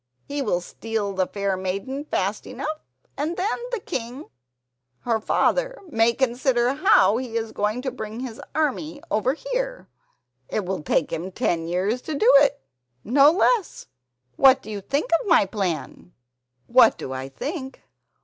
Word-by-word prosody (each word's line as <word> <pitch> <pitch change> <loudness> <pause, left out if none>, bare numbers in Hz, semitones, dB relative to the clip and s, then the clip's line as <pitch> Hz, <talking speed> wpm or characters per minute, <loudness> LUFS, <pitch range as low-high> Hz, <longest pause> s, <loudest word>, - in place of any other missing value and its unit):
He 285 0 -4
will 190 -8 0
steal 215 +2 -4
the 185 -1 0
fair 200 -1 -1
maiden 200 +10 -4
fast 200 -6 -2
enough, 310 +1 -4 0.4
and 310 +5 -2
then 390 +4 0 0.2
the 480 - -1
king, 260 -5 -6 0.7
her 230 -2 0
father, - - +1
may 225 -4 +3
consider 245 0 +1
how 255 - +4
he 240 -2 -3
is 225 -1 -3
going 215 +4 -1
to 260 - -2
bring 220 -1 -6
his 245 -3 -6
army 310 0 -1
over 230 +6 +1
here—it - - -6
will 185 -2 -3
take - - 0
him 180 +4 -4
ten 165 -2 -1
years 190 +8 -1
to 310 - -4
do 255 -1 +5
it!— 280 0 +3 0.4
no 275 +6 +6
less! 400 +4 +1 0.5
What 265 0 +6
do 215 - -8
you 205 -1 -5
think 280 - -2
of 485 - -8
my 335 - +5
plan?" 185 -3 -4 0.5
"What 235 -2 +5
do 130 - -6
I 130 +1 -5
think? 265 - -6
240 Hz, 155 wpm, -24 LUFS, 200-290 Hz, 0.7 s, no